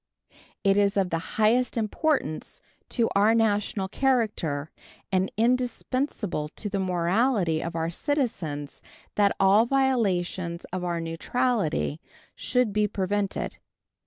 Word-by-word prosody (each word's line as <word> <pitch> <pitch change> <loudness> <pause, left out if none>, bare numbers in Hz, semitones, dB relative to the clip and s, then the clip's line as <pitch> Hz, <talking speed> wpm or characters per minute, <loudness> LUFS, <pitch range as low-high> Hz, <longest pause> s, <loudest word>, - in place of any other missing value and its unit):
It 195 -1 +4
is 200 0 +2
of 190 -2 +1
the 165 - 0 0.2
highest 235 +4 +3
importance 225 - -1 0.3
to 235 -2 +1
our 210 +3 +4
national 210 -3 +1
character 205 - 0 0.4
and 190 0 +1
indispensable 245 - 0
to 210 - -4
the 200 - -1
morality 185 0 +1
of 170 0 -5
our 165 0 -1
citizens 170 - -2 0.3
that 200 -1 +3
all 200 +4 +5
violations 190 -10 0
of 185 -1 -2
our 175 -1 -1
neutrality 165 - -1 0.3
should 250 -5 0
be 210 0 +2
prevented. 200 0 -2
200 Hz, 115 wpm, -26 LUFS, 175-235 Hz, 0.4 s, all